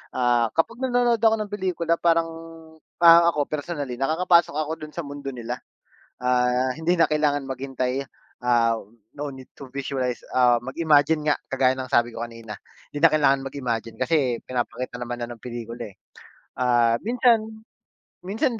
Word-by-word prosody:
Ah, 120 -2 +2
kapag 225 +9 0
nanonood 245 -3 +2
ako 225 0 +4
ng 205 - -12
pelikula 175 -4 -1
parang 165 -1 +2 0.7
parang 170 0 +7
ako, 145 - +2
personally, 145 -5 -4
nakakapasok 170 +2 +3
ako 155 0 -2
do'n 155 0 -10
sa 170 - -3
mundo 140 -1 -8
nila. 120 +1 -5 0.6
Ah, 125 +1 +2
hindi 175 +3 +1
na 165 - +5
kailangan 150 -2 +1
maghintay, 130 0 -3 0.4
ah, 120 -2 +3 0.4
no 145 0 -5
need 130 -1 -11
to 140 - -11
visualize, 130 -2 -3
ah, 125 -2 +4
mag-imagine 150 +2 +2
nga - - +4 0.2
kagaya 130 -1 +2
ng 130 -1 -6
sabi 120 0 +3
ko 115 - -3
kanina. 115 -2 -9 0.3
Hindi 145 - -6
na 165 - +6
kailangan 135 -3 +3
mag-imagine 120 -4 -4
kasi 130 -4 +1
pinapakita 125 0 -3
naman 120 0 -5
na 120 - -3
ng 120 - -10
pelikula, 120 -2 -7
eh. - - -37 0.6
Ah, 120 -2 +3
minsan 235 0 +3 0.8
minsan 220 - -2
135 Hz, 155 wpm, -24 LUFS, 125-165 Hz, 0.8 s, parang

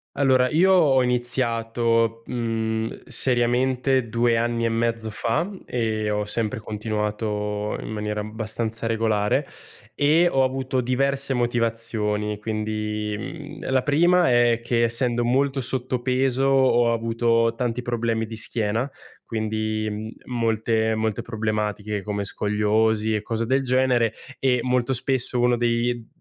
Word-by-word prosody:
Allora, 130 -2 +3
io 185 +5 +4
ho 140 -8 +5
iniziato, 115 -2 0
mhmm, 115 -2 -2
seriamente 125 0 +1
2 115 0 +2
anni 115 0 0
e - - +2
mezzo 115 -1 -1
fa 120 - -1 0.2
e 110 -3 -1
ho 105 0 0
sempre 110 +1 -2
continuato 105 -1 -3
in - - -7
maniera 105 -1 -3
abbastanza 110 +1 -4
regolare, 110 -2 +1 0.5
e 160 +5 +4
ho 135 0 +2
avuto 130 0 -1
diverse 135 +2 0
motivazioni. 115 -3 -1
Quindi, 105 -1 -3 0.4
mhmm, - - -5
la 130 -1 +3
prima 175 +3 +3
è 120 -1 +4
che 120 0 +1
essendo 120 +1 +1
molto 135 +2 +1
sottopeso 130 +1 0
ho 130 -3 +4
avuto 115 0 +1
tanti 125 -1 -1
problemi 115 -2 -1
di 110 -1 -7
schiena 115 +2 -1 0.4
quindi 110 -1 -3
molte 110 -2 0
molte 110 -2 -1
problematiche 105 -2 -2
come 100 0 -2
scoliosi 105 +2 +1
e 105 - -2
cose 115 0 -2
del 135 +2 +2
genere 125 -3 +2 0.2
e 125 -2 +2
molto 125 +1 +1
spesso 130 0 -1
uno 120 0 +3
dei 120 0 0
115 Hz, 125 wpm, -24 LUFS, 110-125 Hz, 0.5 s, ho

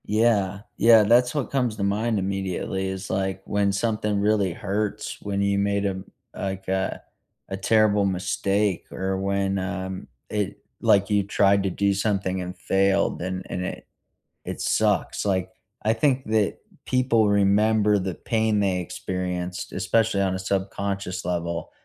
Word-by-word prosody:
Yeah. 105 -3 +2 0.2
Yeah, 115 -1 +7
that's 125 +5 +4
what 145 -4 -2
comes 125 -5 0
to 105 - -3
mind 105 +3 0
immediately 95 0 -2
is, 95 0 -5
like, 95 0 -1
when 100 -1 +1
something 105 0 0
really 100 -2 +2
hurts, 105 +4 -3
when 100 -1 -2
you 100 0 +2
made 100 0 +1
a - - +2
m 95 0 -6 0.3
like, 95 -1 -4
a 95 0 -1 0.5
a 95 - -3
terrible 105 0 +3
mistake 95 +1 0
or 95 0 -2
when, 100 0 0
um, 95 0 -4 0.2
it 105 -2 -3 0.2
like, 100 0 +3
you 105 -1 +3
tried 100 0 +3
to 95 - 0
do 100 +2 +1
something 95 -2 -1
and 90 +1 -6
failed, 95 +1 +1
and 95 +1 -4
and 90 - -3
it - - -6 0.6
it - - -5
sucks. - - +1
Like, 95 -2 0 0.3
I 110 - +2
think 130 +3 +1
that 110 -2 +1 0.3
people 120 -4 +3
remember 105 +1 +3
the 95 -2 -3
pain 110 0 0
they 95 -2 +1
experienced, 90 0 -4
especially 100 +2 +1
on 95 -1 +1
a - - -2
subconscious 95 -1 -2
level, 85 -1 -3
100 Hz, 155 wpm, -24 LUFS, 95-105 Hz, 0.6 s, Yeah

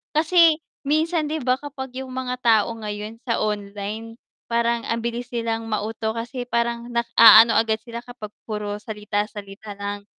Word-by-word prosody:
Kasi 325 0 +5 0.3
minsan 315 +1 +1
'di 310 +1 -3
ba 255 +1 +1
kapag 270 -3 -7
yung 260 -1 -7
mga 255 -1 -3
tao 230 -2 +3
ngayon 210 +1 -6
sa 230 -3 0
online 210 +2 -4 0.3
parang 235 0 0
ang 230 - -1
bilis 235 +1 -4
nilang 230 -1 -2
mauto 220 +1 -2
kasi 245 +2 -5
parang 235 0 -1
nag-aano 230 -1 +7
agad 220 -1 +1
sila 235 -1 -7
kapag 245 -4 -9 0.2
puro 210 -1 -4
salita, 210 -1 -3
salita 205 0 -9
lang. 200 0 -5
230 Hz, 155 wpm, -23 LUFS, 210-250 Hz, 0.3 s, nag-aano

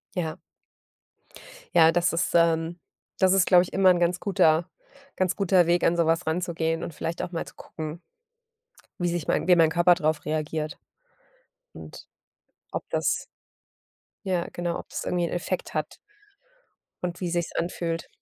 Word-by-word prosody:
Ja. 165 -2 -3 1.4
Ja, 165 0 +7
das 175 +1 +2
ist 165 - 0
ähm, 165 0 +2 0.4
das 190 -1 +4
ist 190 -1 +4
glaube 180 -2 +6
ich 180 - -7
immer 190 -1 +5
'n 175 -1 +3
ganz 175 +1 +1
guter 175 -4 +2 0.5
ganz 185 -1 0
guter 190 -3 +3
Weg, 175 +1 +2
an 170 - +3
sowas 165 +1 +1
ranzugehen 165 -1 -1
und 165 - -6
vielleicht 165 +2 -4
auch - - -4
mal 165 - -3
zu - - -13
gucken 155 +1 -7 1.0
wie 175 - +1
sich 170 -3 -3
mein - - +1
wie 180 - +7
mein 165 -2 +4
Körper 175 +1 +5
drauf 155 -2 -1
reagiert 155 0 -3 1.0
und - - -11 0.7
ob - - -3
das - - 0 1.0
ja, 180 -3 0
genau, 175 -1 -3
ob - - -9
das - - -5
irgendwie 175 -1 0
'n - - -5
Effekt 175 +1 -3
hat 155 -1 -3 1.1
und 175 0 -4
wie 180 - -2
sich's 170 -1 -2
anfühlt 170 -1 -3
170 Hz, 160 wpm, -26 LUFS, 165-180 Hz, 1.4 s, Ja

